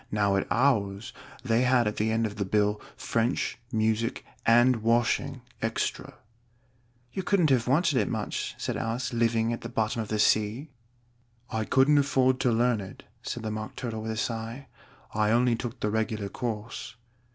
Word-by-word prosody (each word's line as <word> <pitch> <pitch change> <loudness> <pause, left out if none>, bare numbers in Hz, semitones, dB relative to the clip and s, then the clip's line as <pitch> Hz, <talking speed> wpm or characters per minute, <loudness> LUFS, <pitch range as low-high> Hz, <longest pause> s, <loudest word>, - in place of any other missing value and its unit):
"Now 105 -2 +2
at 95 - 0
ours 115 -3 +1 0.3
they 115 -2 +2
had 125 -2 +3
at 105 - -2
the 110 +1 +1
end 115 +1 +1
of 105 -1 -5
the 100 - 0
bill, 105 +1 +1 0.2
'French, 115 +2 -1
music, 110 +1 0 0.2
and 120 +2 +5
washing 120 +3 +1 0.2
extra.'" 115 0 -2 1.0
"You 190 - -2
couldn't 180 -5 +2
have 125 -3 +2
wanted 150 +1 +3
it - - 0
much," 110 -2 -3
said - - -3
Alice; 120 +2 -2
"living 115 0 +1
at 115 - -5
the 115 - -6
bottom 115 -1 -1
of 110 - -5
the 110 - -1
sea." 110 +7 +1 0.8
"I 110 -2 -1
couldn't 140 +5 +4
afford 130 -2 +2
to 125 - +2
learn 120 -1 +2
it," 95 - -10 0.2
said 120 - -5
the 110 - -2
Mock 110 0 -5
Turtle 115 -3 -4
with 110 - -5
a 110 - -3
sigh. 115 +4 -4 0.4
"I 105 0 +2
only 120 +1 +3
took 115 0 -6
the 105 - -1
regular 110 -2 -1
course." 115 -1 -5
115 Hz, 175 wpm, -28 LUFS, 110-125 Hz, 1.0 s, and